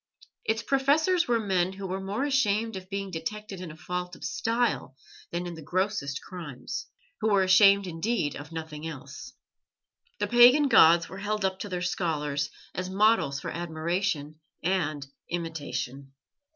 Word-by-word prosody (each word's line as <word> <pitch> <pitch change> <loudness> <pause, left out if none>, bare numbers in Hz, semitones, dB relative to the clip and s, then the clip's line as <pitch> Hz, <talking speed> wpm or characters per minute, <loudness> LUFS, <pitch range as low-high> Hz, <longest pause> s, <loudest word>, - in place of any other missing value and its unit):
Its 225 +1 0
professors 310 +7 +3
were 235 -1 +2
men 190 -3 +1
who 195 0 -7
were 190 +1 -3
more 200 +7 -2
ashamed 225 -6 +1
of 185 0 -8
being 195 -1 -4
detected 195 +3 -5
in 180 - -6
a 155 - -10
fault 180 +2 -4
of - - -14
style 225 - -1 0.3
than 175 +1 -3
in 175 - -5
the 160 - -9
grossest 175 -3 -1
crimes, 175 - -6 0.3
who 220 - +1
were 195 -1 +4
ashamed 200 +1 +6
indeed 170 -2 -1
of 145 +2 -9
nothing 160 -1 -6
else. 140 -3 -9 0.8
The - - 0
pagan 250 +4 +7
gods 170 -7 +7
were 190 - -9
held 210 0 -1
up 190 0 -1
to 205 - -5
their 180 -1 -3
scholars 150 -5 -1 0.2
as 185 0 -3
models 195 -8 +3
for - - -5
admiration 165 -2 -2 0.2
and 155 -6 0 0.2
imitation. 140 -5 -4
185 Hz, 155 wpm, -28 LUFS, 160-210 Hz, 0.8 s, pagan